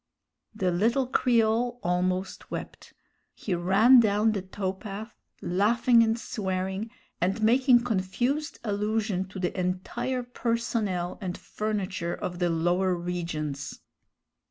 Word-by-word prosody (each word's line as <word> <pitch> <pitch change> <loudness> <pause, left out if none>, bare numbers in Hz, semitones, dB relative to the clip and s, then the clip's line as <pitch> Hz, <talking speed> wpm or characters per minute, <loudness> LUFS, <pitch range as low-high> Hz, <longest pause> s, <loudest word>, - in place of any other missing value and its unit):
The 185 -4 0
little 230 +9 +2
Creole 240 -1 +2
almost 185 +2 -1
wept. - - -7 0.4
He 195 - -3
ran 195 +9 +6
down 215 0 +3
the 205 -3 -2
tow 190 0 -3
path, 210 +3 -8 0.3
laughing 230 +6 +4
and 225 0 +2
swearing, 190 0 -3 0.3
and 195 +5 0
making 245 +1 +5
confused 245 - -1
allusion 210 -2 -1
to 190 - -10
the 180 -1 -2
entire 195 +8 -2
personnel 230 -7 -2
and 180 -2 -4
furniture 200 -5 -3
of 175 -1 -5
the 175 -1 +2
lower 175 +3 +1
regions. 165 -5 -4
200 Hz, 115 wpm, -27 LUFS, 180-230 Hz, 0.4 s, ran